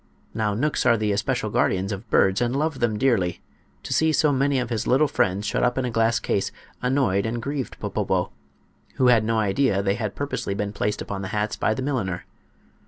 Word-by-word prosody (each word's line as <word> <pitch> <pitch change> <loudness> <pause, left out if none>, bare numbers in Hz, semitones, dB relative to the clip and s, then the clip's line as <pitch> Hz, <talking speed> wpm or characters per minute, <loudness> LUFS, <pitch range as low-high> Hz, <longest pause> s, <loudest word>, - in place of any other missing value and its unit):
Now 105 -2 0
knooks 150 +7 0
are 115 -1 +5
the 105 -1 0
especial 110 +2 -1
guardians 95 +1 +1
of 105 +3 -6
birds, 95 +1 +3
and 120 +1 0
love 150 -1 -1
them 115 -3 +1
dearly. 105 -9 +1 0.4
To - - -3
see 160 0 +3
so 155 -1 +3
many 140 0 +1
of 125 -2 -2
his 115 0 -2
little 135 +4 +4
friends 100 -5 0
shut - - 0
up 125 +1 +1
in 130 - 0
a 125 - -2
glass 115 -1 +2
case 95 - -1 0.3
annoyed 125 -6 +1
and 120 +1 -2
grieved 140 +2 -4
Popopo, - - -1 0.6
who 130 -1 +4
had 115 -3 +5
no 115 +1 0
idea 105 0 +1
they 100 0 +2
had 105 -2 -4
purposely 140 -8 -3
been 105 0 -3
placed 105 0 -2
upon 100 -1 -5
the 95 - -4
hats 105 +1 -2
by 110 - 0
the 130 - -3
milliner. 115 -11 -2
115 Hz, 210 wpm, -24 LUFS, 100-130 Hz, 0.6 s, are